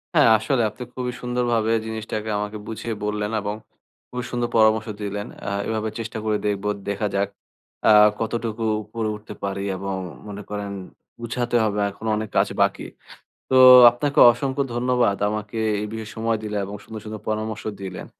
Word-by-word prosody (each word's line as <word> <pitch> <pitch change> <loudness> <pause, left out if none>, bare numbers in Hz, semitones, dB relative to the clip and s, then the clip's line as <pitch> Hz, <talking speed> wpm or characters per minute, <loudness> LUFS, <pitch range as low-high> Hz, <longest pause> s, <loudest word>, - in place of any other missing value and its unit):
হ্যাঁ, - - +6
আসলে 120 +3 0
আপনি 125 - -9
খুবই 125 -1 -3
সুন্দরভাবে 120 -2 0
জিনিসটাকে 110 -1 -4
আমাকে 105 +1 -3
বুঝিয়ে 115 0 -4
বললেন 105 0 -2
এবং 105 +1 -3 0.5
খুবই 125 0 -4
সুন্দর 120 -1 -1
পরামর্শ 110 0 +4
দিলেন। 105 0 -4 0.2
আ - - 0 0.2
এভাবে 110 -1 -1
চেষ্টা 115 0 -5
করে 105 -1 +1
দেখব। 100 -1 -1 0.3
দেখা 100 +1 -1
যাক 100 0 +1 0.6
আ - - +7 0.3
কতটুকু 115 0 -2 0.2
উপরে 110 +1 -3
উঠতে 105 +1 -10
পারি? 100 0 -2 0.2
এবং 95 0 -3 0.3
মনে 105 0 -7
করেন 105 -1 -4 0.5
গুছাতে 120 +1 -2
হবে, 105 -1 0
এখনো 110 +3 -5
অনেক 110 -1 -4
কাজ - - +4
বাকি। - - +2 0.7
তো - - +2 0.4
আপনাকে 140 +5 -2
অসংখ্য 135 +2 -2
ধন্যবাদ 120 -4 +2
আমাকে 105 +1 -4 0.2
এই 105 - -3
বিষয়ে 110 -1 -6
সময় 115 0 0
দিলেন 105 -1 -2
এবং 100 +1 -6
সুন্দর, 110 -1 -8
সুন্দর 110 -1 -7
পরামর্শ 110 0 -2 0.2
দিলেন। 95 -1 -6
110 Hz, 160 wpm, -23 LUFS, 105-115 Hz, 0.7 s, আ